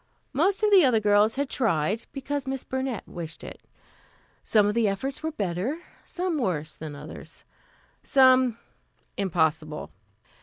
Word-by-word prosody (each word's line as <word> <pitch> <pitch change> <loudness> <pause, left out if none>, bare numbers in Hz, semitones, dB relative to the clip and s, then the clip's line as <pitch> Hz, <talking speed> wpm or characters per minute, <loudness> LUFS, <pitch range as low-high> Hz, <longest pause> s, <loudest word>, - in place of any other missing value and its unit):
Most 375 +9 +2
of 420 - +4
the 385 -4 +8
other 250 -5 +4
girls 210 +1 +3
had 280 +1 -1
tried, 210 - 0
because 280 0 -4
Miss 265 -1 -3
Burnett 260 -4 -3
wished 165 -2 -7
it. - - -9 0.8
Some 210 -2 +4
of 205 - +1
the 230 -1 +2
efforts 235 +8 -3
were 320 0 -2
better, 215 - -3 0.2
some 355 -3 -2
worse, 155 - -2
than 155 -2 -7
others, 145 +2 -10 0.6
some 260 -3 +4 0.6
impossible. 160 -5 -1
225 Hz, 140 wpm, -26 LUFS, 180-275 Hz, 0.8 s, the